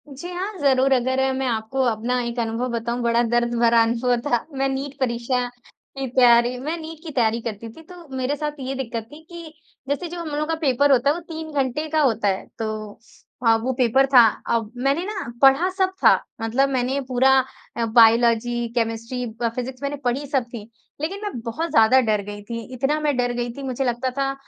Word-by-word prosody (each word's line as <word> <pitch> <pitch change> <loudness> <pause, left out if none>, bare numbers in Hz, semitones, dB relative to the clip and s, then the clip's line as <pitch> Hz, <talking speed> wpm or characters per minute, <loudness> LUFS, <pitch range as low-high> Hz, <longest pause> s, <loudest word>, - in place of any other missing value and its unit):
जी 280 +6 -8
हाँ, 385 +3 -4
ज़रूर 270 -2 +3
अगर 260 +1 +1 0.2
मैं 265 - -1
आपको 225 +3 -2
अपना 240 +2 0
एक 235 0 -4
अनुभव 230 +2 -1
बताऊँ, 235 +1 -2
बड़ा 235 0 +2
दर्द 240 0 +1
भरा 235 0 +5
अनुभव 240 +2 +1
था 240 -4 0
मैं 270 0 +1
नीट 270 +1 -4
परीक्षा 245 0 -1 0.5
की 270 -1 -2
तैयारी 245 -1 +5
मैं 305 +6 -3
नीट 320 -1 -9
की 325 - -7
तैयारी 230 -3 +1
करती 225 0 -6
थी, 275 +9 -14
तो 345 0 -14
मेरे 260 +2 -1
साथ 300 0 -3
ये 265 0 -4
दिक्कत 235 -4 -4
थी 300 +2 -12
कि 340 -3 -10 0.4
जैसे 290 +5 -1
जो 350 +1 -6
हम 335 -2 -5
लोगों 300 +1 -2
का 325 - 0
पेपर 285 0 +3
होता 265 +1 +4
है, - - +4
वो 345 - -6
3 320 -2 -8
घंटे 280 +2 -1
का 310 0 +2
होता 230 -7 +2
है 190 -1 -1
तो 215 -2 -5 0.5
अ, 225 - +6
वो 250 +4 -2
पेपर 255 +2 +3
था। 265 -2 +6 0.4
अब 225 -2 -2
मैंने 275 +7 0
ना 405 - -5
पढ़ा 275 +7 +5
सब 380 -1 +2
था, - - +8 0.3
मतलब 245 +5 +1
मैंने 260 +1 0
पूरा 260 +1 +3 0.5
अ, 235 - +1
बायोलॉज़ी, 235 +1 +4
केमिस्ट्री, 230 +2 -2 0.2
ब 235 - +2
फिजिक्स 255 +1 -5
मैंने 280 +1 -2
पढ़ी 255 +4 0
सब 270 -2 +1
थी, 220 -2 -8 0.3
लेकिन 365 +6 -3
मैं 415 - -3
बहुत 315 +9 -3
ज़्यादा 225 +4 +5
डर 215 -4 +1
गई 205 0 -7
थी। 230 +2 -5
इतना 270 +4 0
मैं 300 -2 0
डर 245 -1 +1
गई 240 0 -2
थी 280 - -8
मुझे 265 0 -2
लगता 245 +1 -1
था 275 0 0
255 Hz, 210 wpm, -22 LUFS, 235-285 Hz, 0.5 s, था